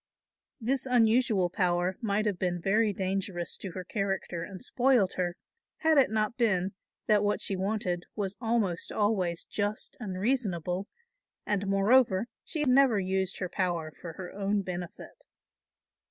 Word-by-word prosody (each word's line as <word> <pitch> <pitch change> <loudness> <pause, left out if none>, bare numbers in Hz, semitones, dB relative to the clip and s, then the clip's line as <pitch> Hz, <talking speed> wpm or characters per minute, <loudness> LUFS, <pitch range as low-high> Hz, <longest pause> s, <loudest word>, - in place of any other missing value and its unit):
This 265 +3 0
unusual 225 -5 +3
power 180 0 +1
might 215 -1 0
have 200 -4 -1
been 175 -1 0
very 210 +4 +2
dangerous 190 -2 -2
to 190 -4 -7
her 185 - -5
character 195 -6 -2
and 190 +2 -7
spoiled 250 -6 +3
her, 175 -1 -1 0.5
had 315 -2 +5
it 270 - +4
not 215 +2 0
been 190 -5 +2 0.3
that 210 -1 +4
what 205 0 +1
she 195 - +1
wanted 185 -2 -2
was 200 -2 -2
almost 225 -7 0
always 190 -5 0
just 205 +1 -3
and 190 -6 -5
reasonable 195 -5 -1 0.6
and 200 -1 -1
moreover 195 +1 +4 0.2
she 310 -2 -2
never 255 -5 +5
used 190 0 -1
her 185 - -2
power 170 -4 -2
for 165 -2 -6
her 180 +2 -8
own 200 0 0
benefit. 180 -2 -7
195 Hz, 145 wpm, -29 LUFS, 185-220 Hz, 0.6 s, had